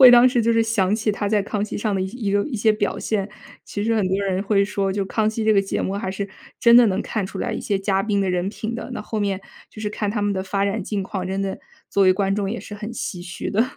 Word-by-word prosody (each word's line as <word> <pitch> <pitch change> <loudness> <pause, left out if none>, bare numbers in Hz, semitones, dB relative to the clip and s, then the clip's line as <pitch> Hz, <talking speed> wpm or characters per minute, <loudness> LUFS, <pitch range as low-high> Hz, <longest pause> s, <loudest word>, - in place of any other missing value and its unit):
会 255 -2 +11
当 245 0 +8
时 245 -1 +2
就 230 +1 +3
是 230 0 +4
想 210 -3 +1
起 215 -1 0
他 205 0 -2
在 210 -1 +2
《康 205 -1 -1
熙》 215 - -5
上 210 -2 0
的 190 - 0
一 200 +3 -3
个 205 - +3
一 270 -6 -4
些 215 +1 +4
表 210 -1 -1
现。 205 -2 -1 0.4
其 205 0 -4
实 230 0 +2
很 200 -4 +1
多 190 - +1
人 190 0 0
会 200 -1 +3
说 200 -1 -1
就 195 +1 -1
《康 215 +1 +1
熙》 220 +1 -2
这 220 - +5
个 200 - +5
节 195 - -2
目 190 - -1
还 195 -2 -2
是 200 +1 -3 0.3
真 235 0 +6
的 240 -1 +8
能 190 -2 0
看 210 -4 -2
出 - - -8
来 - - -2
一 - - -3
些 200 - 0
嘉 195 0 +1
宾 205 -1 +1
的 190 - 0
人 180 +1 0
品 225 +2 -4
的， 235 - -6
那 - - -4
后 215 0 -3
面 200 -2 0 0.3
就 215 - -9
是 210 - -1
看 210 -1 -2
他 210 -1 -1
们 205 0 +1
的 190 - -2
发 195 +1 0
展 200 +2 -1
境 205 -2 -2
况， 190 -1 -4
真 190 +1 -2
的 195 -1 -3 0.3
作 200 - +3
为 185 - +6
观 195 0 0
众 200 -2 -1
也 235 - -3
是 205 - -8
很 210 +2 -6
唏 185 -6 -4
嘘 180 0 -5
的。 215 +3 +3
205 Hz, 325 characters per minute, -22 LUFS, 195-220 Hz, 0.4 s, 会